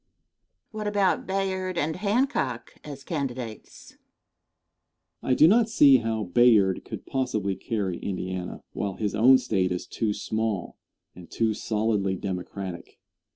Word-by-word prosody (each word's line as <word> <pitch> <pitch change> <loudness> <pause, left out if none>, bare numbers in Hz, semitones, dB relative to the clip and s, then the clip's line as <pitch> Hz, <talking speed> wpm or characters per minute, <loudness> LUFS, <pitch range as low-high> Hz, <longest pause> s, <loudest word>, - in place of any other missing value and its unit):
Question. 215 - -10
What 210 - -3
about 200 -2 +1
Bayard 190 -1 -2
and 160 +2 -1
Hancock 200 - -1
as 140 -2 -9
candidates? 130 -8 -6 1.3
Answer. - - -2
I - - +6
do 155 - +7
not 225 +4 +4
see 145 -11 +6
how 110 -2 -2
Bayard 100 -1 +4
could - - -8
possibly 110 -7 -1
carry 100 -6 -3
Indiana, 95 -1 -5
while 100 -2 -3
his 105 -2 -2
own 125 +5 +6
State 100 -7 0
is 90 - -3
too 110 -2 -2
small 110 -1 -3 0.4
and 90 -2 -13
too 110 -1 0
solidly 105 -3 -1
Democratic. 95 -1 -6
115 Hz, 135 wpm, -26 LUFS, 100-150 Hz, 1.3 s, do